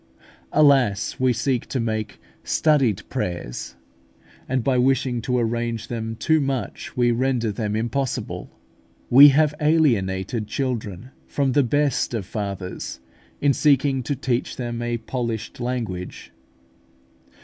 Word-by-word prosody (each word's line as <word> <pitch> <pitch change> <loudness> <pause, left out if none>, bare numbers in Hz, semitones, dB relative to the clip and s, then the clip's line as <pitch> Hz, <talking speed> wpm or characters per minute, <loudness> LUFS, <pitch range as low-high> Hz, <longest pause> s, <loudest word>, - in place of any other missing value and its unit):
Alas! 135 -8 +3
we 130 -1 +3
seek 125 +1 -1
to 130 - -2
make 110 -2 -3 0.2
studied 130 - +2
prayers; 85 - -4 0.7
and 130 -2 0
by 130 +2 +2
wishing 125 -1 +1
to 125 +1 0
arrange 115 -1 -2
them 115 -1 -4
too 160 +7 +2
much, 135 -3 -4
we 120 -1 +3
render 120 -2 0
them 105 0 -3
impossible. 120 +4 -2 0.6
We 140 +4 +10
have 150 +1 +3
alienated 115 - +1
children 120 -4 -3 0.2
from 140 -2 0
the 145 - +4
best 140 -1 +1
of 105 -5 -3
Fathers, 100 - -5 0.4
in 140 -1 +4
seeking 140 -2 +2
to 140 +4 -2
teach 125 -2 -2
them 120 -2 -4
a 120 0 -1
polished 115 -2 -4
language. 115 -8 -4
120 Hz, 125 wpm, -23 LUFS, 110-135 Hz, 0.7 s, We